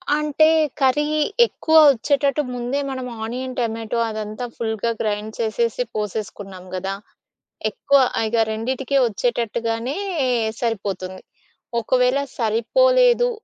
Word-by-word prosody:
అంటే, 300 Hz, +1 st, +3 dB, 0.3 s
కర్రీ 275 Hz, +2 st, +3 dB, 0.4 s
ఎక్కువ 320 Hz, -8 st, -1 dB, 0.2 s
ఒచ్చేటట్టు, 280 Hz, +3 st, +1 dB
ముందే 245 Hz, +3 st, -2 dB
మనం 260 Hz, -1 st, -4 dB, 0.2 s
ఆనియన్ 255 Hz, +3 st, -4 dB
టొమాటో 230 Hz, 0 st, -2 dB
అదంతా 215 Hz, +2 st, -5 dB
ఫుల్‌గా 225 Hz, 0 st, -1 dB
గ్రైండ్ 215 Hz, 0 st, -2 dB
చేసేసి 230 Hz, +1 st, 0 dB
పోసేసుకున్నాం 205 Hz, -3 st, -5 dB
గదా! 190 Hz, +1 st, -3 dB, 0.8 s
ఎక్కువ 280 Hz, 0 st, +2 dB, 0.3 s
ఇగ 220 Hz, +2 st, -1 dB, 0.2 s
రెండిటికిే 260 Hz, +5 st, -1 dB
వచ్చేటట్టుగానే 235 Hz, +2 st, -1 dB, 0.7 s
సరిపోతుంది. 195 Hz, -5 st, -3 dB, 0.6 s
ఒకవేళ 250 Hz, +3 st, +2 dB, 0.2 s
సరిపోలేదు -, -, +3 dB
235 Hz, 95 wpm, -21 LUFS, 215-265 Hz, 0.8 s, అంటే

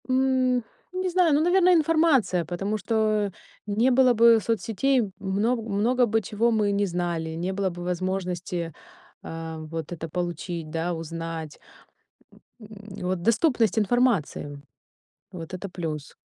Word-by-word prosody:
М, 255 Hz, -1 st, +2 dB, 0.3 s
не 370 Hz, 0 st, -1 dB
знаю, 350 Hz, -3 st, +3 dB
ну, 290 Hz, -, +3 dB
наверно, 365 Hz, +2 st, +4 dB
информация, 310 Hz, -, +3 dB
потому 195 Hz, +6 st, -2 dB
что 225 Hz, +3 st, -3 dB, 0.7 s
н 205 Hz, 0 st, -3 dB
не 245 Hz, +4 st, +4 dB
было 255 Hz, 0 st, +5 dB
бы 230 Hz, 0 st, +6 dB
соцсетей, 230 Hz, +1 st, 0 dB
много 210 Hz, +5 st, 0 dB
много 225 Hz, +4 st, +1 dB
бы 225 Hz, 0 st, +1 dB
чего 220 Hz, +3 st, 0 dB
мы 210 Hz, -2 st, +2 dB
не 200 Hz, 0 st, +1 dB
знали, 175 Hz, -3 st, -2 dB
не 180 Hz, +3 st, -2 dB
было 195 Hz, 0 st, 0 dB
бы 175 Hz, 0 st, -8 dB
возможности, 180 Hz, -2 st, -3 dB, 0.5 s
э, 165 Hz, 0 st, -6 dB
вот 165 Hz, -1 st, -5 dB
это 165 Hz, -1 st, -6 dB
получить, 170 Hz, -1 st, -4 dB
да, 165 Hz, +2 st, -2 dB
узнать. 165 Hz, -1 st, -6 dB, 1.0 s
М, 215 Hz, -, -12 dB, 0.4 s
вот 185 Hz, -1 st, -1 dB
доступность 230 Hz, -, +2 dB
информации. 205 Hz, -, +1 dB, 0.7 s
Вот 165 Hz, -2 st, -8 dB
это 185 Hz, +2 st, -5 dB
плюс. 160 Hz, -5 st, -5 dB
200 Hz, 135 wpm, -25 LUFS, 170-245 Hz, 1.0 s, бы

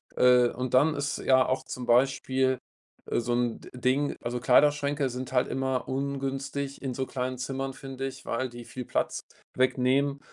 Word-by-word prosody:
Äh, 125 Hz, -1 st, +5 dB
und 125 Hz, 0 st, -4 dB
dann 145 Hz, +4 st, +4 dB
ist 145 Hz, 0 st, -2 dB
ja 130 Hz, -1 st, +4 dB
auch 130 Hz, -, 0 dB
zum 125 Hz, -, -6 dB
Beispiel, 130 Hz, +1 st, +2 dB, 0.5 s
äh, -, -, +1 dB
so 120 Hz, +1 st, -1 dB
'n 120 Hz, -1 st, 0 dB
Ding 130 Hz, +3 st, 0 dB
also, 120 Hz, +1 st, -3 dB
Kleiderschränke 145 Hz, +2 st, +3 dB
sind 125 Hz, +1 st, -6 dB
halt 125 Hz, 0 st, +3 dB
immer 130 Hz, -1 st, -1 dB
ungünstig 140 Hz, +1 st, -3 dB
in 135 Hz, -2 st, -3 dB
so 130 Hz, +1 st, -2 dB
kleinen 130 Hz, 0 st, -3 dB
Zimmern, 135 Hz, +1 st, -3 dB
finde 135 Hz, 0 st, -6 dB
ich, 135 Hz, -, -9 dB
weil 130 Hz, +2 st, -2 dB
die 120 Hz, 0 st, -10 dB
viel 125 Hz, +1 st, -7 dB
Platz -, -, -1 dB, 0.4 s
wegnehmen. 130 Hz, +2 st, +2 dB
130 Hz, 170 wpm, -28 LUFS, 125-135 Hz, 0.5 s, Äh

